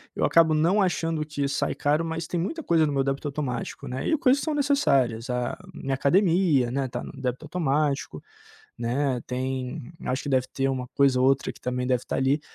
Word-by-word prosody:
eu - - -1
acabo 165 -1 +5
não 170 +7 +3
achando 165 -4 0
que 145 -2 -3
sai - - -1
caro, 150 +3 +1
mas 165 0 -3
tem 175 +1 -2
muita 320 - -3
coisa 160 - +3
no 145 - -2
meu 135 -1 +2
débito 135 +2 -2
automático, 140 -4 -4
né, 130 +1 -3
e 315 - +2
coisas 275 -2 +3
que - - -4
são 310 -2 -1
necessárias, 140 - +2
a 125 -1 -2 0.2
minha 135 - -3
academia, 165 - +3
né, 135 0 -1
tá - - -5
no - - -8
débito 125 +2 -2
automático, 150 -3 -1 0.6
né, 125 +2 0
tem 130 +2 -4
acho 130 +2 -1
que - - -6
deve 130 -2 +2
ter 135 0 0
uma 130 -2 -2
coisa 135 -2 +3
ou 130 - +4
outra 135 0 +2
que - - -19
também 125 0 -2
deve 125 -1 +1
estar - - -4
ali, 135 +3 +2
140 Hz, 210 wpm, -26 LUFS, 130-165 Hz, 0.6 s, acabo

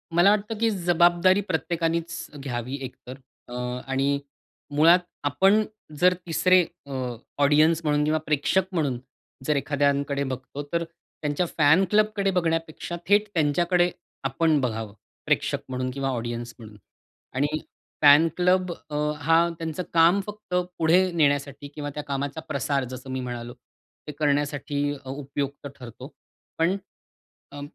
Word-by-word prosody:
मला 175 +4 +6
वाटतं 210 +1 -1
की 230 0 +3
जबाबदारी 175 0 +3
प्रत्येकानेच 165 0 -1
घ्यावी, 125 -1 -4
एक 130 -1 -6
तर. 130 +2 -7 0.3
अ, 120 - -10 0.3
आणि 135 +1 +1 0.6
मुळात, 165 +4 +6 0.2
आपण 195 +9 +3 0.4
जर 180 +1 +5
तिसरे 185 +2 +4 0.3
अ, 140 - -7 0.5
ऑडियन्स 155 +3 +4
म्हणून 150 -1 +2
किंवा 155 +1 +1
प्रेक्षक 155 +5 +1
म्हणून 140 -7 0 0.5
जर 150 - +2
एखाद्यांकडे 140 0 0
बघतो, 130 +2 -5
तर 170 0 +1
त्यांच्या 165 -1 -4
फॅन 155 +5 +5
क्लबकडे 210 -1 +2
बघण्यापेक्षा 165 -1 -1
थेट 205 +1 +4
त्यांच्याकडे 175 +3 +2 0.3
आपण 150 +3 +2
बघावं, 110 -4 -3 0.3
प्रेक्षक - - +1
म्हणून 130 0 -2
किंवा 135 0 -2
ऑडियन्स 120 -1 -4
म्हणून. 105 -2 -12 0.6
आणि 145 +3 +2 0.5
फॅन 150 +2 +7
क्लब 180 0 +2 0.2
अ, 150 - -5 0.2
हा 165 +3 +3
त्यांचं 165 +2 -3
काम 170 +4 +5
फक्त 210 -3 -9 0.2
पुढे 180 +3 +3
नेण्यासाठी 145 -3 0
किंवा 145 -1 -4
त्या 150 - -4
कामाचा 140 +1 -3
प्रसार, 140 -2 -1
जसं 130 +2 -8
मी 130 - -2
म्हणालो, 120 -1 -5 0.5
ते - - -4
करण्यासाठी 145 -1 0 0.2
अ - - -8
उपयुक्त 140 0 -4
ठरतो. 125 +3 -10 0.5
पण 165 +4 +2 0.8
अ, 145 - -8
150 Hz, 130 wpm, -25 LUFS, 140-175 Hz, 0.8 s, फॅन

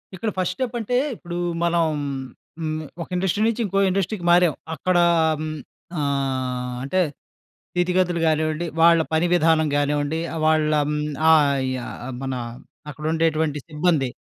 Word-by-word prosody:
ఇక్కడ 215 +4 -2
first 180 0 0
step 250 0 -3
అంటే, 240 +2 0 0.2
ఇప్పుడు 175 -3 -7 0.3
మనం 170 -1 +2 0.7
హ్మ్. 155 -1 -2 0.2
ఒక - - -5
ఇండస్ట్రీ 190 +2 0
నుంచి 230 +1 -1
ఇంకో 195 0 0
ఇండస్ట్రీకి 190 0 -2
మారాం. 175 -2 +5 0.2
అక్కడ 180 +2 0 0.4
హ్మ్. 155 0 -4 0.4
ఆహ్, 130 -3 -2
అంటే 185 +8 +1 0.7
స్థితిగతులు 180 0 +1
గానివ్వండి, 155 +1 0 0.2
వాళ్ళ 165 0 +6
పని 160 +2 +3
విధానం 160 -2 +3
గానివ్వండి, 145 +2 0 0.2
వాళ్ళ 155 -1 +3 0.2
హ్మ్. 150 0 -1 0.3
ఆహ్, 140 -3 +4 0.2
యాహ్ 125 +1 -7
మన 135 0 -2 0.6
అక్కడుండేటువంటి 155 0 0
సిబ్బంది. 150 -3 +1
160 Hz, 125 wpm, -23 LUFS, 150-175 Hz, 0.7 s, వాళ్ళ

